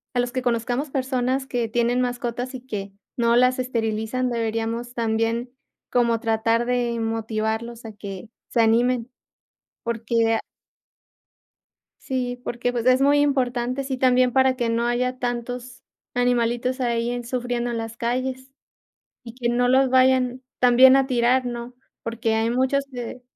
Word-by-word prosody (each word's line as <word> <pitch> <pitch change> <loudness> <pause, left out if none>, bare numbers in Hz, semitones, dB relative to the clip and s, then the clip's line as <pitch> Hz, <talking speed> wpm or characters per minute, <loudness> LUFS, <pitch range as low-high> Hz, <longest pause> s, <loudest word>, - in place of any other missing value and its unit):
a - - +2
los 245 0 0
que 255 0 -2
conozcamos 245 +3 -1
personas 260 0 -1
que 240 -3 -2
tienen 240 +2 +1
mascotas 245 +1 -3
y 250 - -7
que 205 -6 -6 0.3
no 235 -1 +3
las 255 +1 +4
esterilizan, 235 0 -1
deberíamos 230 +1 -2
también 230 +1 -1 0.4
como 235 -2 +2
tratar 225 0 +1
de 240 -1 0
motivarlos 225 +1 -2
a 220 - -7
que 200 0 -8 0.2
se 235 - +2
animen, 240 +2 +2 0.7
porque, 230 0 +1
ah 225 - -1 1.6
sí, 250 -2 -3
porque, 240 +1 -1
pues, 240 -1 -3
es 255 +1 +5
muy 285 +1 +4
importante, 255 -2 0
sí, 265 -1 -3
también 255 -1 +3
para 265 0 +3
que 240 -2 -1
no 235 +1 +1
haya 250 +1 -1
tantos 245 0 -4 0.3
animalitos 245 +1 +1
ahí 235 -1 0
en 245 -1 -4
sufriendo 245 -1 -2
en 235 - -2
las 225 0 -5
calles, 260 +2 -2 0.7
y 230 - -9
que 240 -1 -2
no 245 +1 +2
los 265 +1 +4
vayan 255 -1 +3 0.2
también 255 +1 +7
a 270 -1 +3
tirar, 250 0 +2
¿no?, 240 0 -5 0.3
porque 230 -1 -1
hay 225 +1 +1
muchos 265 +3 +1
que, 245 0 -6
245 Hz, 150 wpm, -23 LUFS, 230-255 Hz, 1.6 s, también